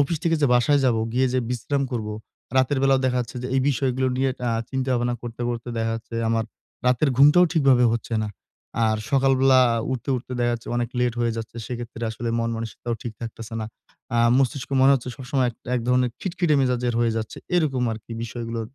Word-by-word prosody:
Office 145 +4 +1
থেকে 165 -1 +3
যে - - +6
বাসায় 140 +4 +4
যাবো, 115 -3 +2
গিয়ে 130 +1 +2
যে - - +3
বিশ্রাম 140 +3 -1
করবো, 105 -3 -3 0.4
রাতের 130 +2 +3
বেলাও 135 -1 +4
দেখা 125 -1 +1
যাচ্ছে 120 +1 -6
যে - - -3
এই 135 - +3
বিষয়গুলো 130 -1 0
নিয়ে 135 0 +1 0.2
আ - - +1 0.2
চিন্তা 130 0 -2
ভাবনা 120 0 0
করতে, 120 0 -8
করতে 120 0 -4
দেখা 115 0 0
যাচ্ছে। 115 +1 -8
আমার 115 0 +1 0.4
রাতের 125 +4 +3
ঘুমটাও 150 +6 +7
ঠিকভাবে 135 -6 +4
হচ্ছে 115 0 -4
না। - - -4 0.6
আর 110 0 +2
সকালবেলা 135 -1 +4 0.3
উঠতে, 130 +2 -5
উঠতে 125 +1 -7
দেখা 120 0 +2
যাচ্ছে, 115 - -9
অনেক 120 -1 0
লেট 125 -1 +1
হয়ে 115 -1 +1
যাচ্ছে। 115 +1 -7
সেক্ষেত্রে 120 -1 -5
আসলে 115 +1 -4
মন-মানসিকতাও 115 +1 -3
ঠিক 120 -4 -5
থাকতেছে 115 -1 -7
না। 110 - -3 0.5
আ - - +3 0.2
মস্তিষ্কে 135 +1 0
মনে 135 +1 +6
হচ্ছে 125 -1 -3
সবসময় 130 -1 0
এ - - -15 0.2
এক 125 - +1
ধরনের 125 -1 +3
খিটখিটে 175 -4 0
মেজাজের 125 -2 0
হয়ে 115 -1 +2
যাচ্ছে। 110 0 -4 0.2
এরকম 135 -7 +1
আরকি 110 +1 -9
বিষয়গুলো 115 0 -4
125 Hz, 195 wpm, -24 LUFS, 115-135 Hz, 0.6 s, ঘুমটাও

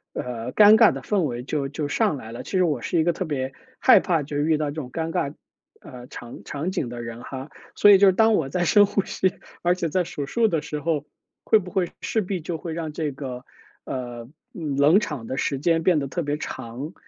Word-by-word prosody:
呃， 120 0 -4
尴 210 0 +8
尬 - - +7
的 - - -6
氛 205 -3 +1
围 125 -5 -2
就 140 0 -2
就 150 0 -3
上 145 - +1
来 110 -3 -9
了。 120 +2 -7
其 - - -10
实 185 - +4
我 150 -8 0
是 170 - -1
一 - - +4
个 170 +1 +2
特 185 - -3
别 135 -4 -3 0.2
害 260 - +7
怕 165 -6 0
就 145 +1 -5
遇 155 +1 +2
到 150 -1 -2
这 - - -10
种 125 -2 -10
尴 165 +2 -3
尬， 140 -1 -2 0.4
呃， 125 -3 -11
场 120 -1 -10
场 155 +6 -4
景 160 -10 -2
的 120 0 -6
人 115 +1 -7
哈， 135 +2 -8 0.2
所 205 - +7
以 195 - +8
就 200 - +7
是 190 - +5
当 220 +3 +4
我 140 -8 +1
在 175 +3 0
深 205 +3 +6
呼 200 - -1
吸， 190 -1 0 0.3
而 175 +1 +2
且 170 -2 -2
在 180 +4 +1
数 145 -4 -5
数 225 +9 +2
的 165 -6 0
时 150 - -4
候， 150 -1 -1 0.4
会 220 - +5
不 180 -3 -6
会 180 -3 0
势 225 -5 0
必 190 -1 -3
就 160 0 -4
会 165 +1 -5
让 160 -2 -4
这 150 -2 -2
个， 130 -2 -7 0.4
呃， 120 -2 -6 0.2
冷 150 +3 +3
场 145 - -5
的 130 - -4
时 135 - -1
间 165 +3 +2
变 175 -1 +3
得 140 -2 -1
特 170 +6 -3
别 145 -1 -2
长。 130 +3 -6
150 Hz, 260 characters per minute, -24 LUFS, 135-175 Hz, 0.4 s, 尴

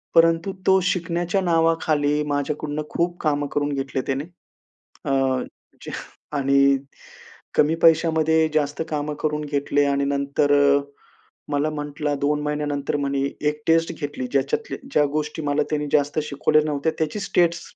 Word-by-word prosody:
परंतु 165 +3 +4 0.2
तो 190 0 +6
शिकण्याच्या 175 +2 -1
नावाखाली 160 -4 +2
माझ्याकडून 145 +1 -2
खूप 175 +1 -1
कामं 145 -2 0
करून 145 0 -1
घेतले 135 -1 -2
त्याने, 135 +1 -1 0.8
अ, 135 - -1 0.7
जे - - -7 0.5
आणि 140 0 +4 0.8
कमी 150 +2 +3
पैशामध्ये 160 -1 +4
जास्त 145 0 0
कामं 150 0 -2
करून 150 -1 -1
घेतले. 145 0 +1
आणि 140 0 +1
नंतर 140 +1 +1
अ, 140 0 +5 0.7
मला 145 +1 +1
म्हटला, 150 0 -3
2 145 +1 0
महिन्यानंतर 150 -1 -2
म्हणे 140 -1 -1 0.3
एक 150 0 -6
टेस्ट 165 +1 +3
घेतली, 145 -4 -5
ज्याच्यातल्या 140 +10 -1
ज्या 150 - +4
गोष्टी 150 +1 -2
मला 145 +1 +1
त्याने 150 -1 -1
जास्त 145 +1 +2
शिकवल्या 150 +1 +2
नव्हत्या, 150 +1 0
त्याचीच 160 +6 -2
स्टेट्स 170 -4 +2
150 Hz, 135 wpm, -23 LUFS, 145-160 Hz, 0.8 s, तो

